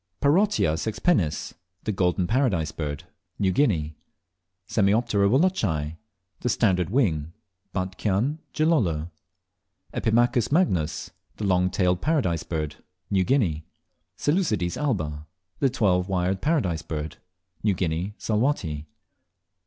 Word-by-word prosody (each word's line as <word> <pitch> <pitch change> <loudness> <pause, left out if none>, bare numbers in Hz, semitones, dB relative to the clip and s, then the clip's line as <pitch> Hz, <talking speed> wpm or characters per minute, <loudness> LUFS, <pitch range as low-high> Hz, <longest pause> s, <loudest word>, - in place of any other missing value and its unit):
8. - - -46
Parotia 195 - +3
sexpennis 105 - 0 0.3
(The - - -1
Golden 90 -2 +1
Paradise 100 - +1
Bird). 75 -3 -4 0.3
New 95 -2 +2
Guinea. 85 - +1 0.8
9. 100 -3 +4
Semioptera 105 -1 +3
wallacei 100 - +1 0.4
(The 125 - -1
Standard 90 -7 +2
Wing). 85 - +1 0.4
Batchian, 100 - -1
Gilolo. 95 - +1 0.8
10. - - -2
Epimachus 120 +1 +2
magnus 95 - +1 0.3
(The - - -5
Long 90 -2 +3
tailed 90 -1 +1
Paradise 130 - +1
Bird). 75 -3 -4 0.3
New 95 -2 +3
Guinea 95 - +1 0.6
11. 160 +7 +3
Seleucides 90 -7 -1
albs 95 - -1 0.4
(The 135 - +3
Twelve 95 -7 +1
wired 95 +1 0
Paradise 125 - +1
Bird).New 90 +5 -5
Guinea, 90 +3 -2
Salwatty. 105 - -1
95 Hz, 115 wpm, -25 LUFS, 85-120 Hz, 0.8 s, 9